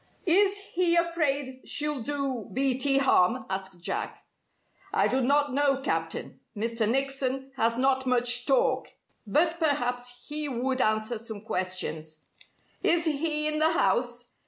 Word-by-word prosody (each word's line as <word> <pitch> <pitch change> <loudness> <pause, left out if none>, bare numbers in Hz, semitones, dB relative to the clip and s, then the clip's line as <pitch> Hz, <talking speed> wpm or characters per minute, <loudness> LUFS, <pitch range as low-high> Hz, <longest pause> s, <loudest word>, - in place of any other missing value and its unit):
"Is 395 +3 +4 0.2
he 345 -1 +2
afraid 290 -6 0
she'll 295 -3 0
do 270 -3 -3
Beatty 270 +1 +3
harm?" 260 -3 +2
asked 190 -1 -4
Jack. - - -4 0.7
"I - - +2
do 265 - 0
not 285 +1 +2
know, 275 -1 +2
Captain. 270 - -3 0.2
Mr. 225 0 0
Nickson 270 +1 -1
has 230 -2 0
not 265 0 +1
much 245 0 +2
talk. 270 -3 +2 0.4
But 325 - +1
perhaps 245 -5 -2
he 300 0 0
would 255 +1 -1
answer 215 +1 0
some 220 -2 -7
questions." 180 -6 -3 0.6
"Is 340 -1 +3
he 300 0 +1
in 305 0 0
the 320 +1 +3
house?" 245 -7 0
265 Hz, 135 wpm, -27 LUFS, 240-295 Hz, 0.7 s, Is